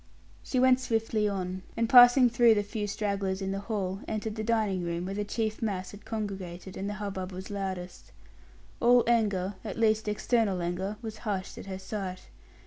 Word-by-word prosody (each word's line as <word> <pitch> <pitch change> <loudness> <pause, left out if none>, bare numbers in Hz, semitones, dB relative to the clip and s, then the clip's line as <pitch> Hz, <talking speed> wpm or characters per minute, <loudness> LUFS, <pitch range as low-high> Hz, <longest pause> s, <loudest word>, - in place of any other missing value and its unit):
She 255 - -1
went 255 0 +5
swiftly 225 -3 0
on; 185 -1 -3 0.2
and 230 0 +2
passing 245 +1 +8
through 235 -1 +5
the 205 - +1
few 205 0 -4
stragglers 200 -2 -2
in 195 -1 -2
the 195 - -2
hall, 195 -2 -3
entered 215 0 -3
the 220 - -3
dining 215 -4 +1
room, 170 +1 -2
where 195 - -4
the 205 +1 -2
chief 215 +1 -2
mass 195 -4 -2
had 205 0 -13
congregated, 190 -4 -5
and 195 +1 -3
the 205 - -4
hubbub 195 -3 -4
was 190 +2 -7
loudest. 190 -3 -5 0.7
All 245 0 +5
anger, 205 -5 +1
at - - -5
least 220 -1 +2
external 210 -2 +1
anger, 180 +4 -3
was 220 -1 -6
hushed 200 -4 -3
at - - -9
her 190 -1 -4
sight. 190 -1 -6
205 Hz, 185 wpm, -29 LUFS, 190-225 Hz, 0.7 s, passing